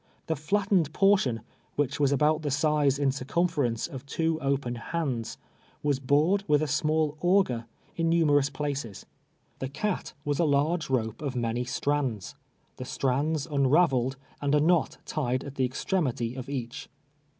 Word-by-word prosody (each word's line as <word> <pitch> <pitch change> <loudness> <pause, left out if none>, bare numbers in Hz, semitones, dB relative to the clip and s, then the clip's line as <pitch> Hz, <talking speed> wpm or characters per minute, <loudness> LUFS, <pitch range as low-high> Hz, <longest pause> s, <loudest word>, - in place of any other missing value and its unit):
The 160 - -1
flattened 185 +1 +1
portion, 190 - +3 0.3
which 145 -1 -1
was 140 -2 +3
abiuit 150 +3 +2
the 150 - -2
size 145 -1 +2
in 140 -1 +2
circumference 135 -3 0
of 135 -6 -7
two 160 +2 -1
open 135 -3 0
hands, 125 -2 -3 0.5
was 145 -3 +1
bored 150 +9 +2
with 150 -1 +3
a - - -1
small 155 +1 +1
auger 175 -11 +2 0.3
in 165 -1 +1
numerous 145 -4 +3
pdaces. 140 -7 -4 0.5
The 130 - -3
cat 185 +8 -3
was 145 -1 -1
a - - +4
large 155 +2 +1
rope 115 -3 -1
of 140 -4 -3
many 120 0 -1
strands 130 -7 -1 0.2
— - - -41
• - - -42
the - - -5
strands 140 +4 0
unraveled, 135 -3 +2 0.2
and 145 0 +2
a - - +4
knot 165 0 +2
tied 130 -4 -1
at 140 - -7
the 130 -2 +1
extrem 175 +5 0
ity 115 -1 -3
of 130 0 -7
each. 125 -4 -5
145 Hz, 160 wpm, -28 LUFS, 130-155 Hz, 0.5 s, a